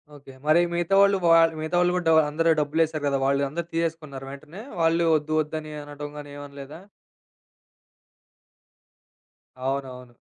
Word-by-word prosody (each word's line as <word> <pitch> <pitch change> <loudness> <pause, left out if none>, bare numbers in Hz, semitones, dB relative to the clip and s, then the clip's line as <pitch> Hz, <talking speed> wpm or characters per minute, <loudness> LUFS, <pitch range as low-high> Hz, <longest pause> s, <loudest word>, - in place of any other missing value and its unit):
Okay. 135 -2 -14
మరి 155 +2 +5
మిగతా 175 +2 +1
వాళ్ళు 200 0 +4
వాళ్ 165 -1 +5
మిగతా 160 +3 -3
వాళ్ళు 180 0 +2
గూడా 180 -1 -2
డ - - +5 0.2
అందరూ 165 +3 +1
డబ్బులేశారు 155 +1 0
గదా! 140 -1 +1
వాళ్ళు 140 +1 +2
అందరూ 170 +4 -4
తీసేసుకున్నారు 160 -5 -3
వెంటనే. 155 +8 -10 0.2
వాళ్ళు 165 +1 +3
ఒద్దు 155 +1 -5
ఒద్దని 155 0 -6
అనటంగాని 145 0 -8
ఏమనలేదా? 145 +1 -10 2.9
అవునవును. 130 -3 -5
155 Hz, 130 wpm, -25 LUFS, 140-165 Hz, 2.9 s, మరి